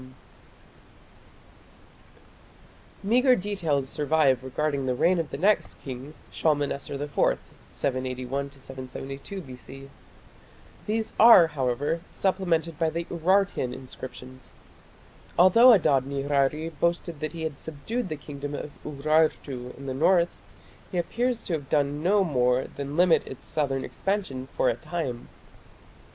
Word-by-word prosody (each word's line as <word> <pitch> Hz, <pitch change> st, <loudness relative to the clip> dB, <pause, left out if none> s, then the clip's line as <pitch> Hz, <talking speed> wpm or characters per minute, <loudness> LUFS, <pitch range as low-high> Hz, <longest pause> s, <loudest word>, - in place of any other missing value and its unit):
Meagre 250 Hz, +5 st, +4 dB
details 170 Hz, -, -1 dB
survive 140 Hz, -3 st, +2 dB
regarding 140 Hz, +1 st, -1 dB
the 125 Hz, -, +1 dB
reign 175 Hz, +7 st, +3 dB
of 165 Hz, -, -2 dB
the -, -, -5 dB
next 200 Hz, +7 st, +2 dB
king, 135 Hz, +3 st, -8 dB, 0.2 s
Shalmaneser 145 Hz, -2 st, -1 dB
IV 145 Hz, +1 st, 0 dB, 0.3 s
(781 130 Hz, +1 st, -3 dB
772 135 Hz, +5 st, -8 dB
B.C). 135 Hz, -1 st, -11 dB, 1.0 s
These 220 Hz, +1 st, -1 dB
are, 225 Hz, -6 st, +9 dB
however, 145 Hz, +4 st, -1 dB
supplemented 170 Hz, -5 st, 0 dB
by 165 Hz, -1 st, +2 dB
the 165 Hz, +2 st, -3 dB
Urartian 175 Hz, -6 st, +1 dB
inscriptions. 130 Hz, 0 st, -10 dB, 0.8 s
Although 230 Hz, +8 st, +8 dB
Adad 140 Hz, -, +4 dB
nirari 140 Hz, +3 st, 0 dB
boasted 170 Hz, -1 st, -1 dB
that 155 Hz, +2 st, -4 dB
he 165 Hz, -1 st, -5 dB
had 155 Hz, -3 st, -4 dB
subdued 185 Hz, +9 st, -4 dB
the 155 Hz, -, -3 dB
kingdom 145 Hz, -1 st, -7 dB
of 145 Hz, -, -6 dB
Urartu 145 Hz, -4 st, 0 dB
in 140 Hz, -, -10 dB
the 130 Hz, -, -3 dB
north, 170 Hz, +5 st, +3 dB, 0.6 s
he 180 Hz, -, -3 dB
appears 235 Hz, +7 st, -1 dB
to 175 Hz, -, -3 dB
have 145 Hz, -4 st, -4 dB
done 145 Hz, -1 st, +1 dB
no 195 Hz, +4 st, +3 dB
more 125 Hz, -5 st, +2 dB
than 140 Hz, +2 st, -6 dB
limit 180 Hz, -1 st, +5 dB
its 130 Hz, -, -9 dB
southern 135 Hz, -3 st, -1 dB
expansion 185 Hz, -11 st, -3 dB
for -, -, +1 dB
a -, -, +3 dB
time. 125 Hz, -1 st, -5 dB
150 Hz, 120 wpm, -26 LUFS, 135-175 Hz, 1.0 s, are